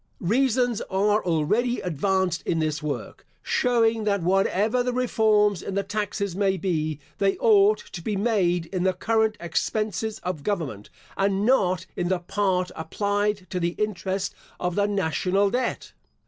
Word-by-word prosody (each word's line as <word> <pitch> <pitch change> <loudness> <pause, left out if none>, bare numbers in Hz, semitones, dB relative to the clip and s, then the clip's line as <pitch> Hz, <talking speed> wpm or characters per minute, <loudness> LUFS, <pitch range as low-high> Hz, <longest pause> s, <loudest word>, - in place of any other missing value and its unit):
Reasons 245 +3 +2
are 205 +2 +2
already 210 +10 +1
advanced 180 +1 0
in 165 - -1
this 155 -1 -1
work, 150 -2 -5 0.2
showing 230 -3 +2
that 200 -3 0
whatever 195 +6 +2
the 250 0 0
reforms 215 -6 +2
in 195 - -5
the 200 - +1
taxes 200 -2 -3
may 195 -1 +1
be, 155 -4 -1 0.2
they 195 -1 +2
ought 210 -1 +5
to 175 - -9
be 210 +4 -2
made 190 -5 +1
in 185 - -1
the 185 +1 +2
current 220 +3 +1
expenses 215 +6 -2
of 180 -5 -3
government, 150 - -3 0.3
and 195 +1 +1
not 185 -7 +2
in 175 - -1
the 185 +1 +1
part 185 0 -1
applied 205 +4 -1
to 180 - -1
the 170 0 -1
interest 195 -2 -2 0.3
of 180 -1 -1
the 205 +2 +1
national 195 +1 +1
debt. 250 +1 -2
195 Hz, 150 wpm, -25 LUFS, 180-215 Hz, 0.3 s, ought